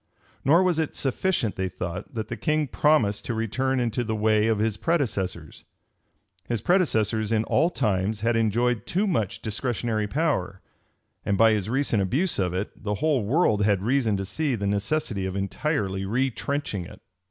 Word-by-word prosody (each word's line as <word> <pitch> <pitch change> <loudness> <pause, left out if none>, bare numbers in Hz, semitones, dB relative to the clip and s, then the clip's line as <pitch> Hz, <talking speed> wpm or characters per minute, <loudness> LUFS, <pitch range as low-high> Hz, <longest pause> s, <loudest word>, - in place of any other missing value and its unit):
Nor 165 +7 +5
was 180 -3 +1
it 160 - -2
sufficient, 135 - -1
they 95 -1 -1
thought, 90 +4 -6
that 110 -2 -3
the - - -4
king 155 -1 0
promised 125 -10 +2
to 120 - -2
return 130 +4 0
into 120 0 0
the 110 -1 -2
way 110 0 +2
of 110 -1 +2
his 110 0 0
predecessors. 100 - -2 0.9
His 120 -2 0
predecessors 110 - +1
in 110 -1 +2
all 160 +8 +2
times 105 - -1
had 115 +1 +1
enjoyed 115 +1 +1
too 195 +4 +1
much 115 - -1
discretionary 110 -1 -2
power; 125 - -1 0.6
and 100 - 0
by 115 +1 +6
his 105 -2 -1
recent 130 -4 +1
abuse 140 - 0
of 90 -2 +1
it, 95 +3 -3
the 105 0 -1
whole 145 -2 +1
world 110 - +2
had 100 -2 +2
reason 115 -3 +1
to 95 - -3
see 145 +5 -1
the 100 -2 -3
necessity 100 0 -1
of 95 - -5
entirely 100 - -1
retrenching 130 0 -2
it. - - -12
110 Hz, 170 wpm, -25 LUFS, 100-140 Hz, 0.9 s, by